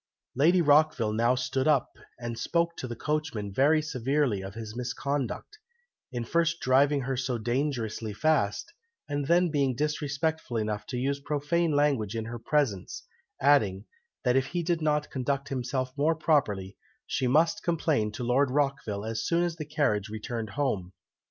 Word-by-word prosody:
Lady 170 Hz, +7 st, +4 dB
Rockville 145 Hz, -7 st, +4 dB
now 120 Hz, +3 st, +3 dB
stood 130 Hz, +2 st, -1 dB
up, 145 Hz, -5 st, +3 dB, 0.3 s
and 120 Hz, -1 st, -4 dB
spoke 170 Hz, +6 st, 0 dB
to 130 Hz, -, -4 dB
the 120 Hz, -, -5 dB
coachman 150 Hz, -9 st, -2 dB
very 150 Hz, +6 st, +4 dB
severely 130 Hz, -6 st, 0 dB
on 95 Hz, +1 st, -7 dB
his 110 Hz, 0 st, -7 dB
misconduct, 140 Hz, -, -3 dB, 0.5 s
in 120 Hz, -2 st, -3 dB
first 170 Hz, +4 st, +1 dB
driving 140 Hz, +2 st, +3 dB
her 135 Hz, +1 st, -2 dB
so 125 Hz, -1 st, -1 dB
dangerously 120 Hz, -2 st, -2 dB
fast, 140 Hz, -, 0 dB, 0.3 s
and 145 Hz, -1 st, -2 dB
then 175 Hz, +1 st, +3 dB
being 140 Hz, -4 st, +1 dB
disrespectful 150 Hz, -1 st, -1 dB
enough 105 Hz, -1 st, -2 dB
to 125 Hz, -, -4 dB
use 140 Hz, +3 st, -1 dB
profane 150 Hz, +4 st, 0 dB
language 140 Hz, -8 st, +1 dB
in 110 Hz, -1 st, -2 dB
her 120 Hz, +1 st, -6 dB
presence, 115 Hz, -6 st, -1 dB, 0.4 s
adding, 110 Hz, -9 st, +3 dB, 0.4 s
that 125 Hz, -2 st, +2 dB
if 135 Hz, 0 st, +2 dB
he 175 Hz, -1 st, -2 dB
did 170 Hz, 0 st, 0 dB
not 150 Hz, -1 st, 0 dB
conduct 140 Hz, +1 st, -2 dB
himself 130 Hz, 0 st, -2 dB
more 155 Hz, +3 st, +2 dB
properly, 110 Hz, -, +1 dB, 0.3 s
she 130 Hz, -, -1 dB
must 155 Hz, +6 st, +3 dB
complain 155 Hz, -10 st, 0 dB
to 105 Hz, -, -6 dB
Lord 130 Hz, +3 st, +2 dB
Rockville 130 Hz, -7 st, -1 dB
as 115 Hz, 0 st, -3 dB
soon 170 Hz, +1 st, +2 dB
as 170 Hz, -1 st, -2 dB
the 155 Hz, -, -5 dB
carriage 130 Hz, -9 st, 0 dB
returned 110 Hz, +1 st, -4 dB
home. 100 Hz, -11 st, -1 dB
135 Hz, 160 wpm, -28 LUFS, 115-150 Hz, 0.5 s, Lady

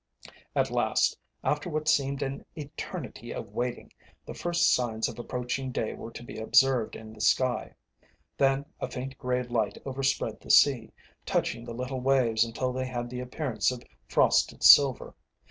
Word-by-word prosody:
At -, -, +1 dB
last, -, -, +2 dB, 0.3 s
after 150 Hz, +3 st, -1 dB
what 155 Hz, -1 st, -3 dB
seemed 140 Hz, -2 st, +2 dB
an 135 Hz, 0 st, -4 dB
eternity 145 Hz, -2 st, -7 dB
of -, -, -6 dB
waiting, 120 Hz, 0 st, -4 dB, 0.3 s
the -, -, -7 dB
first 175 Hz, 0 st, +2 dB
signs 115 Hz, -3 st, 0 dB
of 115 Hz, -1 st, -8 dB
approaching 125 Hz, +2 st, -3 dB
day 110 Hz, -, -2 dB
were 115 Hz, -, -8 dB
to -, -, -8 dB
be 120 Hz, -, -8 dB
observed 120 Hz, +1 st, +3 dB
in 110 Hz, 0 st, -10 dB
the 110 Hz, -, -10 dB
sky. 120 Hz, +2 st, +1 dB, 0.6 s
Then 135 Hz, 0 st, +2 dB
a -, -, -3 dB
faint 130 Hz, 0 st, -6 dB
grey 125 Hz, -1 st, -1 dB
light 120 Hz, -3 st, -1 dB
overspread 135 Hz, 0 st, -1 dB
the -, -, -15 dB
sea, 130 Hz, -6 st, +5 dB, 0.3 s
touching 115 Hz, -, -1 dB
the 120 Hz, -1 st, -7 dB
little 125 Hz, +1 st, -4 dB
waves 125 Hz, -4 st, +3 dB
until 125 Hz, +2 st, -2 dB
they 130 Hz, 0 st, -2 dB
had 120 Hz, -1 st, -4 dB
the 125 Hz, -, -5 dB
appearance 125 Hz, 0 st, -1 dB
of 125 Hz, -1 st, -7 dB, 0.2 s
frosted -, -, +2 dB
silver. 140 Hz, -3 st, +7 dB
125 Hz, 165 wpm, -28 LUFS, 120-135 Hz, 0.6 s, silver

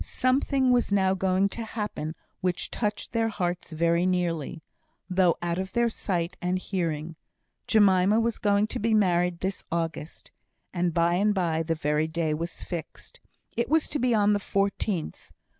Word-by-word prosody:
Something 260 Hz, 0 st, +1 dB
was 245 Hz, -4 st, +2 dB
now 190 Hz, -1 st, +3 dB
going 190 Hz, +1 st, +2 dB
to 230 Hz, -, -5 dB
happen, 210 Hz, -8 st, -4 dB, 0.2 s
which 180 Hz, -1 st, -2 dB
touched 210 Hz, -2 st, -3 dB
their 225 Hz, -1 st, +1 dB
hearts 175 Hz, -5 st, -3 dB
very 170 Hz, +2 st, +2 dB
nearly, 170 Hz, -4 st, -1 dB, 0.4 s
though 180 Hz, -2 st, +3 dB
out 170 Hz, +1 st, -1 dB
of 190 Hz, 0 st, -4 dB
their 235 Hz, 0 st, +2 dB
sight 180 Hz, -5 st, -2 dB
and 180 Hz, +1 st, 0 dB
hearing. 165 Hz, -4 st, -3 dB, 0.5 s
Jemima 205 Hz, -1 st, +4 dB
was 230 Hz, -1 st, 0 dB
going 205 Hz, 0 st, +3 dB
to -, -, -4 dB
be 225 Hz, +1 st, +2 dB
married 180 Hz, -4 st, +2 dB
this 190 Hz, +1 st, -3 dB
August, 165 Hz, -1 st, -4 dB, 0.4 s
and 175 Hz, -1 st, 0 dB
by 170 Hz, +1 st, +2 dB
and 205 Hz, +3 st, +2 dB
by 165 Hz, -4 st, +1 dB
the 165 Hz, 0 st, -1 dB
very 150 Hz, 0 st, 0 dB
day 160 Hz, -1 st, -1 dB
was 165 Hz, +2 st, -5 dB
fixed. 170 Hz, -3 st, -8 dB, 0.4 s
It 235 Hz, -, -1 dB
was 315 Hz, +1 st, +3 dB
to 295 Hz, -, -2 dB
be 245 Hz, -1 st, +2 dB
on 210 Hz, -1 st, +4 dB
the 205 Hz, -, +1 dB
14th. 200 Hz, -3 st, -2 dB
185 Hz, 165 wpm, -27 LUFS, 170-210 Hz, 0.5 s, Jemima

